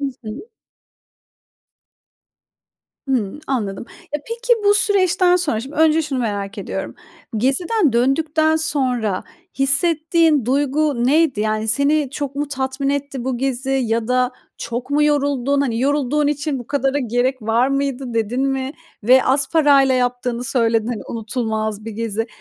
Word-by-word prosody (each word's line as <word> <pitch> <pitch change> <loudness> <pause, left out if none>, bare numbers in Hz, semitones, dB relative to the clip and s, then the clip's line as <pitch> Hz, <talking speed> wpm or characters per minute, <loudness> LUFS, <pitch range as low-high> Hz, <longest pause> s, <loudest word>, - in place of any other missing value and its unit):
I 280 - -2 0.2
hı. 235 - -8 2.6
Hımm, 240 -2 -1
anladım. 215 -6 -3 0.3
E, - - +1
peki 480 +1 +1
bu 410 0 +5
süreçten 370 -3 +3
sonra, 295 -11 -1
şimdi 275 +5 -9
önce 320 +1 +4
şunu 275 -4 -3
merak 205 -2 -3
ediyorum. 195 0 -5 0.4
Geziden 300 - +1
döndükten 310 +6 +2
sonra 255 -10 0 0.3
hissettiğin 310 0 +3
duygu 280 -1 +1
neydi? 290 -5 +2
Yani, 215 0 -1
seni 280 +4 +2
çok 285 -1 -4
mu 290 0 -2
tatmin 265 0 -2
etti 280 -3 -3
bu 260 -2 -2
gezi 265 0 -2
ya 235 -3 0
da 250 0 +2 0.3
çok 240 +3 -5
mu 295 +1 +2
yoruldun? 285 -2 +1
Hani, 235 -4 -1
yorulduğun 290 +1 +1
için 290 -1 -1
bu 245 - -9
kadara 280 0 0
gerek 250 0 -1
var 230 +4 +2
mıydı 275 -3 -2
dedin 230 +3 -1
mi? 270 +1 -2 0.3
Ve 255 +3 +5
az 265 +1 +2
parayla 280 -4 +4
yaptığını 245 -1 -1
söyledin. 230 -3 +1
Hani, 240 -3 -4
unutulmaz 220 -2 -3
bir 225 - -5
gezi. 225 0 -3
265 Hz, 140 wpm, -20 LUFS, 235-290 Hz, 2.6 s, bu